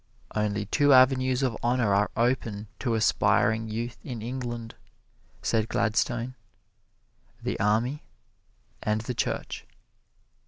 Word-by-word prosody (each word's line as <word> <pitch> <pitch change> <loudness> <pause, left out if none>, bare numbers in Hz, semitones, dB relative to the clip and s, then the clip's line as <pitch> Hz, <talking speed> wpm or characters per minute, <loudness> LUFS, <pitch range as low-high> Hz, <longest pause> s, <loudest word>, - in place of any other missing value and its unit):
"Only 105 -1 0
two 145 +6 +4
avenues 130 0 +5
of 125 -4 0
honor 120 -4 +2
are 100 +1 +3
open 115 -4 0
to 120 -3 0
aspiring 110 0 +2
youth 115 +2 -4
in 120 -5 -6
England," 120 -2 -5 0.7
said 110 -1 +1
Gladstone 120 +2 0 1.1
"the - - -2
Army 115 +8 +1 0.8
and 110 0 0
the 125 +3 -4
Church." - - -3
115 Hz, 110 wpm, -27 LUFS, 110-125 Hz, 1.1 s, avenues